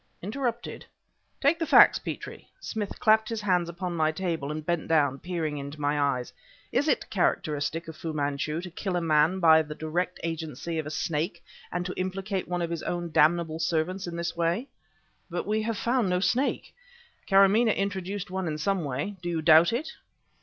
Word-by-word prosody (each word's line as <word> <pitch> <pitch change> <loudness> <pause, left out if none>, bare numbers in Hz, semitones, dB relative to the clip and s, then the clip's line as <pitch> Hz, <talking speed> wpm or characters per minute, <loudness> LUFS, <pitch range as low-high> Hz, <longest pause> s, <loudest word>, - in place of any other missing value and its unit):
"Interrupted!" 235 +3 -3 0.6
"Take 290 +4 +3
the 330 - 0
facts, - - +7
Petrie," - - -7
Smith 215 - -4
clapped 220 0 +4
his 225 -2 -3
hands 180 -4 +1
upon 175 0 -4
my 155 -1 +2
table 160 -4 -3
and 155 0 -5
bent 170 -1 -1
down, 145 -4 +2
peering 160 -5 -3
into 140 +2 -7
my 145 0 0
eyes 135 -3 -1 0.4
"is 290 - +1
it - - +1
characteristic 160 -3 0
of 160 - -8
Fu 160 +1 -5
Manchu 150 +2 -2
to 180 -1 -8
kill 185 +1 -3
a - - +2
man 160 +3 +3
by 160 -2 +6
the 150 -1 -7
direct 175 +4 -2
agency 165 0 -4
of 155 - -4
a - - -3
snake 160 +3 -2 0.3
and 175 +1 -2
to 180 - -3
implicate 190 +1 -3
one 175 -1 -1
of 170 - -3
his 165 -2 -3
own 175 -1 -3
damnable 160 +1 +3
servants 170 +4 -1
in 170 - -5
this 170 0 -3
way?" 170 +9 0 0.6
"But 175 - -3
we 215 +1 0
have 225 0 -2
found 240 -3 +1
no 180 0 +1
snake!" 235 +10 0 0.5
"Karamaneh 200 +3 +5
introduced 195 -1 -3
one 190 -1 -2
in 155 -1 -2
some 190 +3 0
way. 145 +9 -3
Do 175 - -3
you 165 -2 -2
doubt 160 +1 +7
it?" 265 +8 -2
175 Hz, 190 wpm, -27 LUFS, 155-195 Hz, 0.6 s, facts